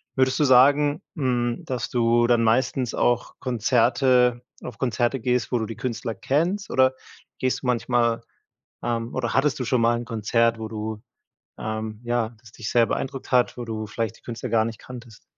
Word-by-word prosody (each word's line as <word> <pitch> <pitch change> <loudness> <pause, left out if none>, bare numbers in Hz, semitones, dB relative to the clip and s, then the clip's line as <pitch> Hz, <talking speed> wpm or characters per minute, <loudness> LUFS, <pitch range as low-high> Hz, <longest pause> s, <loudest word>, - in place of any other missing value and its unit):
Würdest 130 +2 +2
du - - +4
sagen, 145 +4 +5
hm, 120 -4 -1
dass 125 -2 -3
du 120 0 +3
dann 120 -1 +3
meistens 125 +1 +1
auch 120 0 0
Konzerte 125 +1 +2 0.2
auf 115 - -7
Konzerte 120 +1 0
gehst, 125 0 0
wo 125 - +2
du 110 - -1
die 115 - -7
Künstler 115 0 -3
kennst 170 - -1
oder 130 0 +3 0.5
gehst 130 +1 -1
du - - -3
manchmal, 120 -1 +1 0.6
ähm 115 0 -2
oder 120 -3 -1
hattest 140 +2 +1
du 125 - -2
schon 125 -1 +1
mal 120 +1 +3
'n 120 - -5
Konzert, 115 +1 +1
wo 110 - -4
du 110 -1 -5 0.6
ähm, 110 0 -4
ja, 120 -2 0
das 115 -2 -17
dich 110 -3 -6
sehr 120 -1 +4
beeindruckt 135 +2 -4
hat, 125 -1 +3
wo 120 - -5
du 110 -1 -4
vielleicht 110 +1 -4
die - - -26
Künstler 120 -1 -6
gar 110 -1 +3
nicht 115 -2 -6
kanntest? 120 -3 -12
120 Hz, 185 wpm, -24 LUFS, 115-130 Hz, 0.6 s, sagen